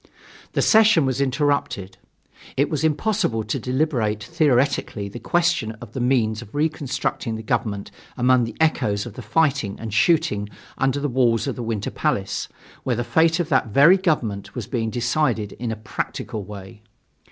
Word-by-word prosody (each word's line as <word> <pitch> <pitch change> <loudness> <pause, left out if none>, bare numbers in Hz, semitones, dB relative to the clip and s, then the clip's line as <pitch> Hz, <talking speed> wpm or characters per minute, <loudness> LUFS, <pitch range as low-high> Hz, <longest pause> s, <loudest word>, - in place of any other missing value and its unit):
The - - +1
session 215 - +5
was 130 +1 0
interrupted. 140 -8 0 0.6
It 140 +4 +2
was 150 -2 -1
impossible 160 - +1
to 110 - -2
deliberate 125 -6 0
theoretically 135 - +1
the 110 +4 -8
question 170 -5 +1
of 110 0 -12
the - - -4
means 120 -3 +1
of 110 +1 -12
reconstructing 140 -6 -1
the 110 - -6
government 105 -2 -2 0.3
among 125 -1 +4
the 115 - -7
echoes 105 -10 +1
of 120 - -8
the 125 - -8
fighting 135 -4 +1
and 110 -2 -6
shooting 150 -6 +2 0.3
under 135 +1 +1
the 145 - -1
walls 120 -4 +2
of - - -2
the - - -5
Winter 110 -3 -3
Palace, - - -1 0.3
where 125 - -1
the 120 - -1
fate 165 +6 +3
of 170 - -1
that 130 -5 +2
very 140 - +6
government 120 - -1
was - - -4
being 115 -4 -2
decided 120 -2 0
in 120 -1 -2
a - - -2
practical 110 0 -5
way. 100 +2 -10
125 Hz, 165 wpm, -22 LUFS, 110-150 Hz, 0.6 s, very